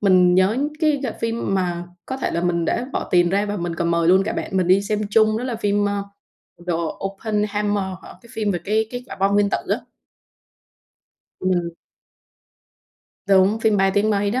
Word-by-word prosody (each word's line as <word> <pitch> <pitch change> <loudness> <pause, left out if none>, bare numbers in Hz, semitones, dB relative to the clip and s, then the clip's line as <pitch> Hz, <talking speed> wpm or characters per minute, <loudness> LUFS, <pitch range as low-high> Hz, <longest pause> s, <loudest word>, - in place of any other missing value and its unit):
mình 185 -3 +5
nhớ 185 +5 +3 0.2
cái 305 -3 +2
g 270 - -1
phim 230 -3 -1
mà 175 -2 -1 0.2
có 265 - -4
thể - - -2
là 170 - -1
mình 170 -1 0
đã 245 - -1
bỏ - - -3
tiền 175 -1 +4
ra 200 +2 +1
và 205 0 -3
mình 175 -1 -3
còn 170 0 -1
mời 170 0 +2
luôn 190 +2 +5
cả - - -2
bạn 190 - -4
mình 185 - +2
đi 190 +2 +4
xem 210 +1 -1
chung 215 0 +3
đó 245 - -4
là 245 -3 -3
phim, 205 -1 +1
ơ, 200 0 -2 0.7
"The - - +2 0.3
Oppenheimer" 210 0 -1 0.2
hả? - - -12
cái 235 - -17
phim 215 -2 -1
về 175 -3 -2
cái 220 +2 +1
cái 245 0 -6
quả - - -8
bom 195 +1 +1
nguyên 205 0 +3
tử - - +1
á. - - 0 1.6
Ừm. 180 -2 0 1.6
Đúng, 195 +2 +4
phim 220 -2 +3
ba 195 0 +3
tiếng 210 +1 +2
mấy 205 -1 +1
đó. 250 +4 0
200 Hz, 205 wpm, -21 LUFS, 185-215 Hz, 1.6 s, mình